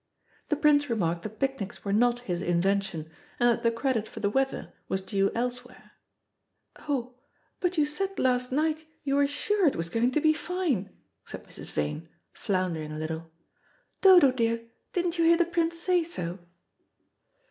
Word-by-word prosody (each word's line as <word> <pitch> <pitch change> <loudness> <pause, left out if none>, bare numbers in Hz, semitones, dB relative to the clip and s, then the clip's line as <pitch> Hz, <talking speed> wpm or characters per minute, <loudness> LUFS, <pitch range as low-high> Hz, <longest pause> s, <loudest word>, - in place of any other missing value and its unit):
The 300 - +2
Prince 290 -1 +3
remarked 175 -7 0
that 215 +3 -8
picnics 265 -9 -3
were 200 - 0
not 240 +3 +3
his 180 -7 -3
invention, 175 -2 0 0.3
and 240 - +4
that 235 0 +1
the 230 - +3
credit 230 -1 -1
for - - -9
the 200 -1 0
weather 270 +3 -1 0.2
was 190 0 -1
due 195 0 +1
elsewhere. 245 +1 -4 0.9
"Oh, 255 -4 -3 0.5
but 360 -1 -1
you 300 - +4
said 385 +6 -3
last 250 -1 +1
night 310 +3 0 0.2
you 275 -1 0
were 285 0 +4
sure 380 +6 +1
it 280 - +2
was 165 0 -3
going 230 +4 +2
to 305 - +3
be 310 +1 +4
fine," 315 - -1 0.4
said - - -8
Mrs. - - -8
Vane, 75 - -3 0.2
floundering 180 -6 -2
a 155 - -5
little. 160 +1 -4 0.7
"Dodo, 360 -8 +8
dear, 230 -2 0 0.3
didn't 350 -1 -1
you 330 - +4
hear 335 0 +6
the 345 - +3
Prince 335 0 0
say 355 0 +2
so?" 180 - -5
245 Hz, 170 wpm, -28 LUFS, 195-310 Hz, 0.9 s, Dodo